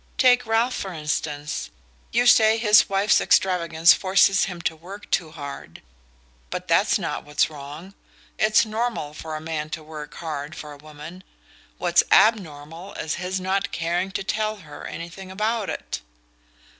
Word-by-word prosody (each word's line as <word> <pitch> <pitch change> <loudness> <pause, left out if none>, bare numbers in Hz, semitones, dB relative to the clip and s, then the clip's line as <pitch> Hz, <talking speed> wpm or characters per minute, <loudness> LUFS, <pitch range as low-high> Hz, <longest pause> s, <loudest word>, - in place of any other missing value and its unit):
Take 245 -2 +4
Ralph 230 +3 +2
for 190 - -4
instance 150 -1 -3 0.4
you 240 +1 +2
say 220 -2 +6
his 215 -2 +5
wife's 195 +1 +3
extravagance 170 -3 +4
forces 195 0 +3
him 180 -3 -6
to 165 - -1
work 190 +6 -11
too 165 -3 +1
hard; 145 -3 -9 0.7
but - - -5
that's - - +3
not - - -4
what's 150 +1 0
wrong. 150 +6 -9 0.5
It's 215 +1 +4
normal 220 -8 -3
for 160 0 -7
a - - -4
man 155 -1 -4
to 155 - -14
work 150 -1 -9
hard 155 -1 -5
for 150 -3 -8
a - - -12
woman 155 +5 -11 0.5
what's 175 -1 +3
abnormal 180 -4 +2
is 160 - -3
his 185 +1 -2
not 190 +1 -1
caring 175 +3 -1
to 195 - -2
tell 215 +2 -1
her 145 - -9
anything 175 +3 -8
about 215 +2 -1
it." - - -5
180 Hz, 155 wpm, -24 LUFS, 155-205 Hz, 0.7 s, say